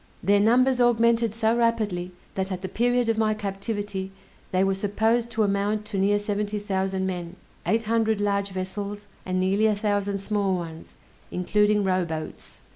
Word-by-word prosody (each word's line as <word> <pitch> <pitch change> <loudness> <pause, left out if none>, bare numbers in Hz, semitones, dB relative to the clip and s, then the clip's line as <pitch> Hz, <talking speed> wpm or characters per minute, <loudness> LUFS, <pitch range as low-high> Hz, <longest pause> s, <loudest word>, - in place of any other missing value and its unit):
Their 200 +3 +4
numbers 250 +4 +4
augmented 235 -2 +3
so 225 0 +2
rapidly, 215 -7 0 0.2
that 190 0 -2
at 185 0 -4
the - - -2
period 245 +4 +1
of 225 -1 +1
my 215 -1 +2
captivity 205 -1 -4 0.4
they 185 +1 +2
were 195 0 +2
supposed 220 +4 +1
to 225 -2 0
amount 205 +1 0
to 210 -2 -4
near 200 +2 +3
seventy 205 0 -2
thousand 190 -2 -1
men, 180 -2 -4 0.3
eight 225 +1 +2
hundred 220 -1 +1
large 200 -1 0
vessels, 200 +2 -5 0.2
and 185 0 0
nearly 195 +4 +3
a 215 - +2
thousand 205 -1 0
small 200 -1 0
ones, 165 -2 -7 0.3
including 210 +3 +2
rowboats. 175 -4 -3
205 Hz, 160 wpm, -25 LUFS, 190-220 Hz, 0.4 s, Their